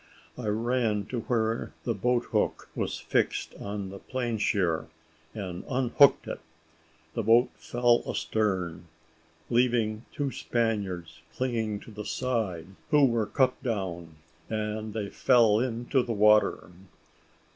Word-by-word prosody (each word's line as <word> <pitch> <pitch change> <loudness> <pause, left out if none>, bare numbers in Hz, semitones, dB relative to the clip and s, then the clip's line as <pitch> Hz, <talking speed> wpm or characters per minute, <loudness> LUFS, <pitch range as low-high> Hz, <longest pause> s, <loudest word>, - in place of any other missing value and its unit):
I 125 -3 -5
ran 110 -1 0
to 125 - -2
where 115 -1 -1
the 115 - 0
boat 120 +4 +1
hook - - 0
was - - -2
fixed - - 0
on 100 -1 -4
the 100 0 -9
planeshear, 110 -9 -1 0.5
and 95 -4 -5
unhooked 130 +2 +4
it; - - -4 0.7
the - - -1
boat 115 +3 +4
fell 120 0 +2
astern, 90 -6 -1 0.6
leaving 115 -2 +2
two 140 -2 -2
Spaniards 95 -11 -2
clinging 115 -5 -1
to - - -12
the 105 0 -7
side, 110 -10 -2 0.2
who 150 -3 +6
were 115 -4 +1
cut 130 +3 +1
down, 90 - -3 0.3
and 110 0 -3
they 105 -2 -2
fell 115 -4 +4
into 120 +2 0
the 120 -1 -3
water. 105 -5 +4
110 Hz, 125 wpm, -28 LUFS, 100-120 Hz, 0.7 s, who